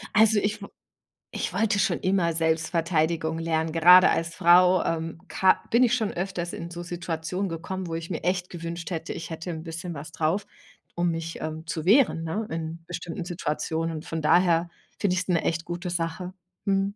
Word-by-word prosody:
Also, 220 -1 +6
ich 210 +1 -2
w 200 - -7 0.6
ich - - -3
wollte 205 +2 +1
schon 190 -3 +1
immer 185 -3 +1
Selbstverteidigung 160 0 0
lernen. 160 -1 -1
Gerade 180 +3 +8
als 165 0 0
Frau, 180 +2 +5
ähm, 165 0 -3
ka 190 - +3
bin 235 +2 +4
ich 240 -2 +3
schon 225 -4 +1
öfters 175 -1 -3
in 170 +1 -6
so 175 - -6
Situationen 175 +2 -3
gekommen, 180 +3 -5
wo 165 - -5
ich 165 0 -5
mir 165 - -4
echt 180 +1 0
gewünscht 170 0 -6
hätte, 165 -2 -4
ich - - -7
hätte 165 +2 -5
'n 160 -1 -5
bisschen 165 +1 -6
was 155 +2 -8
drauf, 165 +6 -1 0.5
um 175 0 +1
mich, 165 0 -5
ähm 155 +1 -5
zu 160 -1 -3
wehren, 215 -5 +4
ne, 205 +7 -3
in 165 +1 -5
bestimmten 175 0 -5
Situationen. 165 -1 -2
Und 155 - -8
von 165 -1 -4
daher 170 +1 +4 0.3
finde 200 -3 +1
ich's 185 -1 -1
'ne 175 -3 +1
echt 165 0 -1
gute 175 +1 -4
Sache. 175 +2 -3 0.3
Mhm. 195 0 +1
170 Hz, 190 wpm, -26 LUFS, 165-185 Hz, 0.6 s, Gerade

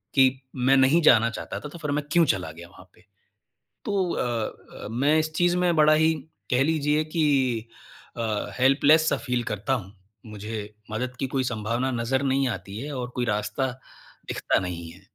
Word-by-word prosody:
कि 135 -2 +7 0.3
मैं 130 +2 +3
नहीं 135 +6 +5
जाना 115 -4 +6
चाहता - - -6
था 150 - -7
तो 170 - -10
फिर 150 -2 -3
मैं 145 +1 0
क्यों 170 +1 +5
चला 90 - -1
गया 85 +2 -11
वहाँ 90 0 -16
पे। - - -24 0.8
तो 195 -4 0
अ - - -1 0.6
अ, - - -4
मैं 140 +7 +2
इस 155 0 -2
चीज़ 175 +1 +2
में 180 -1 +2
बड़ा 155 0 +5
ही 160 +1 +4 0.4
कह 125 +1 +4
लीजिए 150 0 +1
कि 130 -8 +1 0.5
अ, 110 -3 -2
हेल्पलेस 145 +4 +5
सा - - +1
फ़ील 125 -3 -2
करता 105 +6 -1
हूँ। 105 -6 -4 0.3
मुझे 105 0 -6 0.2
मदद 125 +3 -3
की 135 - -1
कोई 130 0 -1
संभावना 120 +2 -1
नज़र 125 +3 0
नहीं 135 0 +1
आती 100 -2 -6
है 145 +4 -5
और 125 -1 -4
कोई 125 - 0
रास्ता 105 +4 -1 0.6
दिखता - - +1
नहीं 85 -3 -5
है। 90 +3 -16
130 Hz, 185 wpm, -25 LUFS, 110-150 Hz, 0.8 s, कि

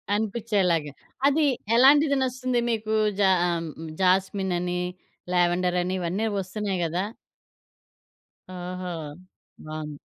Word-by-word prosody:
అనిపించేలాగా, 200 -8 0 0.4
అది 295 +2 +3 0.3
ఎలాంటిది 280 +3 +6
నచ్చుతుంది 255 -1 0
మీకు? 220 -1 -2 0.3
జా 195 -2 +5 0.2
ఆహ్, 170 -1 -1
హ్మ్, 160 -1 -7
జాస్మినని, 185 -1 +1 0.5
లావెండర‌ని 180 +1 +1
ఇవన్నీ 185 +6 -1
వస్తున్నాయి 195 0 -3
గదా! 175 +4 -1 1.5
ఓహో! 180 0 -5 0.8
బావుంది. 155 -2 -6
185 Hz, 90 wpm, -25 LUFS, 175-220 Hz, 1.5 s, ఎలాంటిది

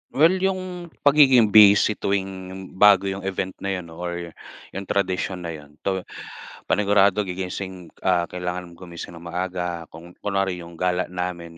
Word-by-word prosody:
Well, 165 +6 +4
'yung 185 -2 -2 0.2
pagiging 135 -7 +6
busy 105 0 +7
tuwing, 95 -1 -3
bago 100 -1 +6
'yung 95 0 -5
event 95 -1 -2
na 100 0 -2
'yun 85 -3 -7
or 85 0 -5 0.4
'yung 95 0 -6
tradisyon 95 -2 -1
na 85 - -4
'yun, 75 -2 -11
'to 95 -1 0 0.7
panigurado 100 0 +3
gigising, 90 -1 -5 0.2
ah, 90 -2 +2
kailangan 90 -1 -5
gumising 85 -1 -9
nang 85 - -12
maaga, 90 -1 -4
kung 85 +2 -13
kunwari 95 -3 -1
'yung 85 0 -12
gala 90 0 0
namin 90 -2 -5
95 Hz, 145 wpm, -23 LUFS, 90-100 Hz, 0.7 s, busy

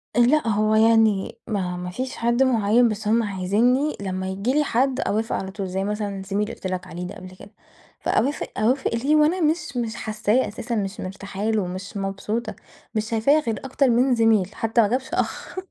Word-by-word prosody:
أ - - +3
لأ، 250 +3 +4
هوَ 215 0 +2
يعني 220 -2 +3
ما 185 -5 -2
ما 180 0 -5
فيش 255 +8 -4
حد 235 +2 +2
مُعين 235 -1 +3
بس 215 0 -4
هُم 230 +2 +3
عايزينّي 220 +9 +1
لمّا 190 -1 -3
ييجي 195 +7 -1
لي 300 +1 +3
حد 265 0 +1
أوافق 220 -1 -1
على 190 0 -4
طول. 195 0 -4
زي 190 +1 -2
مثلًا 205 -1 -3
زميلي 200 +1 0
اللي 220 +3 -5
قُلت - - -6
لَك 185 0 -4
عليه 180 0 -6
ده - - -8
قبل 185 -2 -11
كده. 195 +2 -14 0.5
فأوافق، 280 +5 0
أوافق 250 +5 +1
ليه 275 +6 +2
وأنا 310 +5 +3
مش 310 -4 0
مش 230 -3 -2
حاسّاه 215 +3 0
أساسًا 230 +2 -4
مش 200 -2 -3
مرتاحه 195 +1 -6
له، 215 -3 +1
مش 185 +2 -6
مبسوطة، 210 +4 -3 0.4
مش 215 0 -1
شايفاه 235 +7 +3
غير 225 -8 -3
أكتر 270 0 +2
من 245 +2 +3
زميل، 220 -4 +2
حتى 225 +1 +2
ما 215 - +3
جابش 255 +4 -2
أخ - - -3
220 Hz, 200 wpm, -23 LUFS, 195-245 Hz, 0.5 s, لأ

